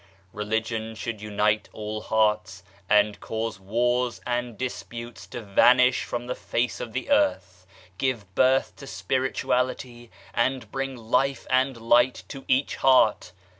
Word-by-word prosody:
Religion 110 +1 -2
should 110 -1 -5
unite 105 0 0
all 110 0 -5
hearts 105 -4 0 0.3
and 105 0 +3
cause 110 -2 -4
wars 120 +4 0
and 120 -2 -2
dis 130 -1 -3
putes 120 0 -9
to 120 - -7
vanish 125 +5 +4
from 120 0 -4
the 125 - -3
face 120 -1 -2
of 115 - -6
the 130 - -4
earth, 290 +1 +1 0.3
give 115 -8 -2
birth 130 +5 +2
to 140 - -11
Spirituality, 125 -2 -2 0.2
and 120 -2 -1
bring 135 0 -3
Life 125 +4 0
and 130 0 +2
Light 120 +2 +3
to 135 -2 -9
each 130 +2 +1
heart. 125 -8 +3
120 Hz, 135 wpm, -25 LUFS, 110-130 Hz, 0.3 s, vanish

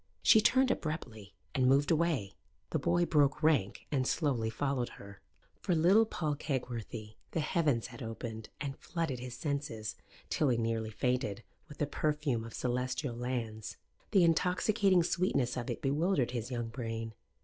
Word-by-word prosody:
She 220 - +7
turned 260 +3 +4
abruptly 120 - -4 0.2
and 130 -1 +3
moved 140 +3 +4
away. 155 - +1 0.4
The - - +1
boy 175 0 +2
broke 150 -1 +2
rank 140 -11 +2
and 130 -3 +1
slowly 130 -8 +1
followed 130 +1 -1
her. 100 0 -12 0.4
For 180 - 0
little 190 +8 +5
Paul 155 -8 -1
Kegworthy 120 -6 -4 0.2
the - - 0
heavens 150 -7 +1
had 120 -1 -9
opened 115 -1 -6
and 140 -1 -4
flooded 165 -7 -3
his 125 0 -7
senses, 140 -8 -3 0.4
till 150 - +2
he 120 - +2
nearly 115 -1 -1
fainted, 120 -1 -1 0.3
with 150 - -11
the 150 - +1
perfume 145 -4 -1
of 115 - -8
celestial 125 +1 -1
lands. 115 -3 -4 0.3
The 195 -4 +5
intoxicating 180 +3 +3
sweetness 150 -8 +1
of 120 -2 -4
it - - -4
bewildered 145 -1 +1
his 120 -1 -3
young 120 -3 -3
brain. 115 -1 -4
130 Hz, 155 wpm, -32 LUFS, 115-155 Hz, 0.4 s, She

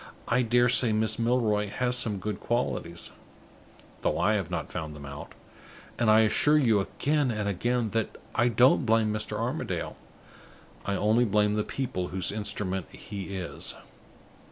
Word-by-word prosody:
I 125 - +3
dare 120 +1 +3
say 120 -1 +3
Miss 110 +1 0
Milroy 115 -3 +1
has 125 +4 0
some 110 -4 0
good 105 0 -4
qualities, 85 -8 -2 0.9
though - - 0
I 110 - +3
have 95 -6 -1
not 90 - -4
found 80 -3 -5
them 70 -1 -9
out; 70 +1 -8 0.7
and 120 -2 +3
I 110 +1 +7
assure 145 +7 +4
you 115 -8 +4
again 145 +7 0
and 105 -3 -2
again 115 +3 0
that 115 -1 -2 0.2
I 120 - +3
don't 120 +4 +4
blame 110 -2 +2
Mr. 110 0 -3
Armadale. - - -3 0.9
I 100 - 0
only 110 +5 +3
blame 105 -1 +2
the 105 0 +1
people 100 -10 -3
whose 95 -1 -2
instrument 100 -3 -3
he 100 -1 -7
is." 90 -2 -4
110 Hz, 155 wpm, -28 LUFS, 100-120 Hz, 0.9 s, I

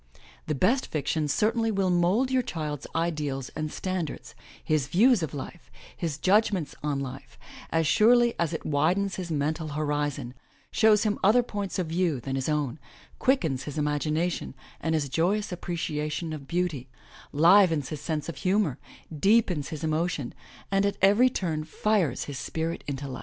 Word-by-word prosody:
The 155 - 0
best 230 - +2
fiction 155 +1 -1
certainly 225 +8 +1
will 195 -3 +1
mould 185 +9 +2
your 260 -1 +3
child's 150 - -5
ideals 150 -5 -2
and 155 0 -4
standards, 185 -5 -4 0.3
his 155 -4 +1
views 220 - +4
of 160 - -3
life, 155 +5 -8 0.3
his 160 -5 -3
judgments 190 -3 +2
on 145 -2 -1
life, 135 0 -7 0.3
as 165 0 +1
surely 235 +7 +5
as 170 -3 +1
it - - -5
widens 175 +7 +1
his 180 -2 -5
mental 155 +1 -1
horizon, 145 -4 -2 0.4
shows 220 -1 +4
him 210 -2 0
other 225 +6 +5
points 205 -4 -4
of 185 - 0
view 165 -3 0
than 135 +3 -5
his 135 +2 -1
own, 150 -2 -1 0.4
quickens 160 - +1
his 145 0 -6
imagination 150 +2 -1 0.2
and 160 0 0
his 150 -3 0
joyous 185 +10 0
appreciation 160 -2 -3
of 140 -3 -8
beauty, 160 -7 -2 0.4
livens 165 -2 +5
his 155 -3 -5
sense 155 -3 -3
of 170 - -6
humor, 185 -7 +1 0.4
deepens 185 -3 +2
his 155 -2 -6
emotions, 160 -3 -1 0.4
and 195 0 +3
at 200 0 0
every 210 +6 +6
turn 165 -10 -2
fires 175 - 0
his 140 -2 -6
spirit 165 +4 -3
into 140 0 -4
life. 130 -1 -6
160 Hz, 160 wpm, -27 LUFS, 150-195 Hz, 0.4 s, every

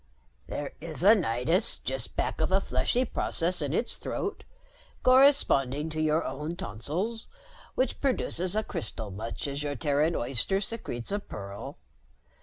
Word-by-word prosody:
"There 145 - -5
is 160 0 -2
a 205 +3 +9
nidus 170 - +3
just 130 -2 -1
back - - -1
of 160 - +1
a 190 - +4
fleshy 195 - +1
process 175 -6 0
in 145 -2 -1
its 235 +9 -1
throat, - - -4 0.6
corresponding 160 - +4
to 155 0 -2
your 155 +1 +2
own 150 +5 -4
tonsils, 175 - -3 0.5
which 260 - 0
produces 190 - 0
a 215 - +1
crystal 110 - -3
much 110 +8 -5
as 140 +1 -3
your 145 -1 -2
Terran 145 +5 +1
oyster 130 - 0
secretes 195 - -2
a 205 - 0
pearl. 100 - -8
155 Hz, 145 wpm, -28 LUFS, 130-195 Hz, 0.6 s, a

